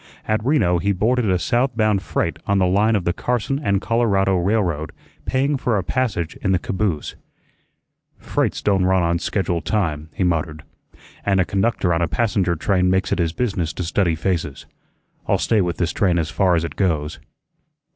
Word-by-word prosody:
At 110 0 0
Reno 110 - +2
he 100 +3 +1
boarded 115 +3 +1
a 90 - +3
south 120 +7 0
bound 110 -3 +2
freight - - -2
on 100 - +2
the 95 - +3
line 105 +5 +3
of 100 - 0
the 85 - 0
Carson 125 +6 -1
and 100 -9 +1
Colorado 100 -4 +1
railroad, 90 -4 0 0.3
paying 135 +2 +1
for 120 -4 0
a 95 - -1
passage 105 -11 -2
in 95 - 0
the - - +3
caboose. 95 -3 -2 1.0
"Freights - - -2
don' 95 -2 +2
run 95 -1 +2
on 85 0 +1
schedule 90 -2 -1
time," 80 -5 -2
he - - 0
muttered, 80 -3 -1 0.6
"and 95 -1 +2
a 95 - +3
conductor 95 -3 0
on 85 - 0
a 85 - +2
passenger 90 +2 0
train 90 +2 +1
makes 95 0 +1
it - - 0
his 85 -2 +1
business 95 -7 -2
to 90 - -4
study 85 0 +1
faces. 80 -4 -3 0.6
I'll - - +3
stay 110 -3 +2
with 90 -2 -2
this 85 -3 0
train 90 -4 +1
as 80 -3 -1
far 90 +2 +2
as 80 - 0
it 85 - -5
goes." 80 -5 -1
95 Hz, 185 wpm, -21 LUFS, 85-105 Hz, 1.0 s, a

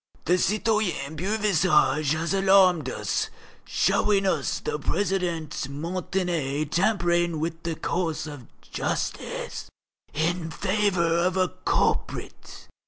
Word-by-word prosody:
The 180 +3 +3
citoyen 210 -9 0
Beauvisage 175 -6 +2
has 165 +4 -1
alarmed 190 -6 +4
us, - - -2 0.4
showing 200 -2 +2
us 165 -7 0
the 150 - -3
President 175 -3 -1 0.2
Montané 165 -2 -2
tampering 175 -4 +1
with 165 +1 -3
the 165 -1 -3
course 165 -1 -2
of 145 -6 -9 0.2
justice - - -4 0.4
in 165 +2 -1
favour 185 -2 +1
of 180 +2 +1
a 185 -1 +2 0.2
culprit. - - -1
175 Hz, 105 wpm, -26 LUFS, 160-190 Hz, 0.4 s, alarmed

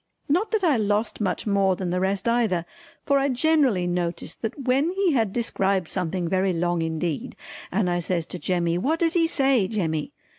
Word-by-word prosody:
Not 355 +9 +1
that 435 -3 0
I 310 -8 +4
lost 210 +1 -1
much 190 -3 -1
more 195 -2 +2
than 180 -1 -3
the 180 - 0
rest 190 +3 -1
either, 220 -8 +1 0.4
for 280 -1 +3
I 275 +1 +1
generally 265 - +2
noticed 175 -1 -3
that 225 +4 -3
when 265 +5 +2
he 380 -1 +1
had 225 -8 +1
described 195 -5 0
something 180 -1 -2
very 185 +1 +1
long 175 0 0
indeed 160 -1 -3 0.4
and 190 0 +1
I 175 0 0
says 170 -1 -1
to 180 - -5
Jemmy 175 -1 0
"What 315 - 0
does 330 -1 +2
he 330 -2 +3
say 270 - +2
Jemmy?" 160 -8 -2
195 Hz, 190 wpm, -24 LUFS, 175-270 Hz, 0.4 s, I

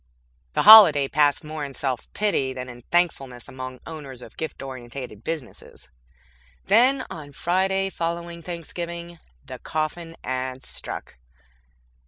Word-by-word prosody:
The - - +2
holiday 190 -11 +10
passed 145 0 +2
more 155 0 -5
in 140 -2 -6
self 130 -3 -3
pity 170 -11 0
than 125 -1 -6
in 120 0 -11
thankfulness 135 -8 0
among 130 -1 -8
owners 140 -6 -8
of - - -13
gift 160 -2 -5
oriented 125 -4 -8
businesses. 155 - -7 0.8
Then, 255 +5 +4
on 145 -3 -9
Friday 190 +4 0
following 170 0 -4
Thanksgiving, 170 0 -6 0.3
the 130 -2 -9
coffin 165 +2 -4
ads 130 0 -4
struck. - - -7
155 Hz, 125 wpm, -24 LUFS, 130-170 Hz, 0.8 s, holiday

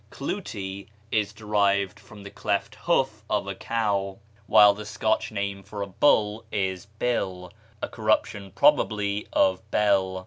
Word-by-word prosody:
"Clootie" 95 0 -5 0.2
is 105 -2 +1
derived 100 -2 0
from 105 -1 -14
the 100 - -9
cleft - - -2
hoof - - +1
of - - 0
a - - -4
cow; 100 -4 -1 0.3
while 105 -2 +7
the 105 +1 -8
Scotch 110 +1 -1
name 100 -1 -3
for 100 +1 -6
a - - -5
bull 105 0 +2
is 95 -2 -2
Bill, 95 -7 -2 0.3
a - - 0
corruption, 110 -3 -1
probably, 105 -1 +2
of 95 -1 +2
Bel. 95 -3 +2
100 Hz, 140 wpm, -26 LUFS, 95-105 Hz, 0.3 s, while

